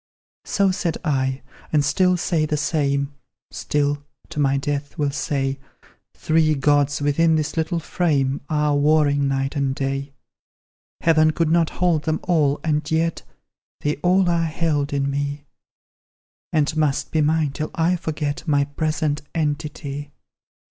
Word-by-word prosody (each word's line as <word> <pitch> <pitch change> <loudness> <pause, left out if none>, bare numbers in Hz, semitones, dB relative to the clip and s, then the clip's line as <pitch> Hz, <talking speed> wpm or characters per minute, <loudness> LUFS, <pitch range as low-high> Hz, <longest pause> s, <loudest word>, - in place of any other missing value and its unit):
"So 200 -1 +2
said 180 -3 -2
I, 130 -2 0 0.3
and 150 -2 +3
still 180 +5 +3
say 165 -3 0
the 150 - 0
same; 140 -2 0 0.4
Still, 145 0 -1 0.3
to 160 -2 -5
my 140 -1 +2
death, 145 +1 -3
will 145 -2 0
say 135 -1 -2 0.6
Three 155 -1 +2
gods, 145 +1 +2
within 160 +3 +3
this 155 -2 -1
little 165 +1 0
frame, 145 -5 0
Are 150 -1 +1
warring 145 -1 +3
night; 135 +1 -1
and 135 -2 0
day; 135 +1 -3 0.9
Heaven 155 -1 +4
could 160 0 0
not 165 -1 +3
hold 175 -4 0
them 160 0 0
all, 150 -5 +2
and 150 -2 0
yet 165 +1 0 0.6
They 145 +1 0
all 180 +4 +3
are 170 -1 +2
held 155 -3 -1
in 140 -1 0
me; 140 +1 -3 1.1
And 155 0 +1
must 150 -3 0
be 160 - +2
mine 155 -1 +2
till 155 +2 -4
I 170 +2 +2
forget 155 -2 -3
My 145 -2 +3
present 155 0 -1
entity! 145 -2 -3
150 Hz, 140 wpm, -22 LUFS, 140-160 Hz, 1.1 s, Heaven